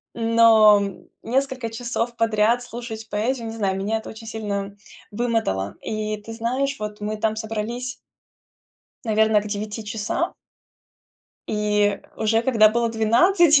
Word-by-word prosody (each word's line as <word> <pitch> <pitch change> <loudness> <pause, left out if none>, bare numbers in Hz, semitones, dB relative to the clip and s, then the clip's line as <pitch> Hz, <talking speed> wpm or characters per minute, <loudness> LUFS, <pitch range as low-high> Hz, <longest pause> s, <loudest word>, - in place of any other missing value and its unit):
Но, 225 -2 +6
м, 200 -2 -6 0.2
несколько 260 -1 -1
часов 235 +1 -3
подряд 225 +1 +2
слушать 235 -2 -7
поэзию- 230 +3 -1
не 225 - -6
знаю, 195 -4 -1
меня 205 +3 -1
это 220 - -10
очень 225 +1 -10
сильно 200 -3 -4 0.4
вымотало. 210 - -1
И, 215 0 -3
ты 225 - -8
знаешь, 255 +5 -1
вот 210 0 -6
мы 215 +1 -3
там 215 0 0
собрались 225 +3 -4 1.1
наверно, 220 -1 +3
к 210 - -7
9 210 +1 -4
часам. 210 0 -2 1.2
И 210 -1 +1 0.2
уже 225 +1 +2
когда 225 -4 +5
было 235 +2 +1
12, 290 - +4
220 Hz, 130 wpm, -23 LUFS, 210-235 Hz, 1.2 s, Но